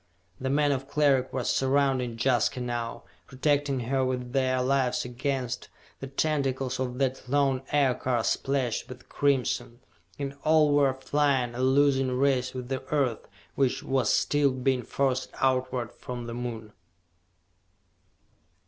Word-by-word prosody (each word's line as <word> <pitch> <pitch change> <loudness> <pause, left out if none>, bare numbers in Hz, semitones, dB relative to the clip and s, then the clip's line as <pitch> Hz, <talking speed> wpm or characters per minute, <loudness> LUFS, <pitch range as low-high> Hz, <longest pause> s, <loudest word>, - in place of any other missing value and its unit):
The 130 - -2
men 145 +1 +2
of 135 -1 -2
Cleric 140 -3 +2
were 130 - -2
surrounding 130 -3 +1
Jaska 125 0 +2
now, 120 -1 -4 0.2
protecting 140 0 0
her 130 +3 0
with 125 -1 -3
their 130 -1 +1
lives 130 -2 +1
against 125 0 -3 0.3
the 135 - -6
tentacles 135 -2 -1
of 125 -1 -3
that 130 -2 -2
lone 135 -2 +2
Aircar 130 -4 +1
splashed 135 -3 -1
with 125 -1 -11
crimson 135 -4 0 0.4
and 140 -1 -4
all 155 -1 +4
were 140 -2 +3
flying 135 -2 +1
a 120 - -6
losing 135 -1 +3
race 130 -1 +1
with 125 -1 -5
the 130 -1 -2
Earth, 135 -7 0 0.3
which 135 -1 0
was 130 -4 +1
still 145 -1 +2
being 130 0 0
forced 130 +1 -1
outward 130 -2 0
from 125 -1 -7
the 115 - -6
Moon! 115 -3 -6
130 Hz, 135 wpm, -27 LUFS, 125-140 Hz, 0.4 s, all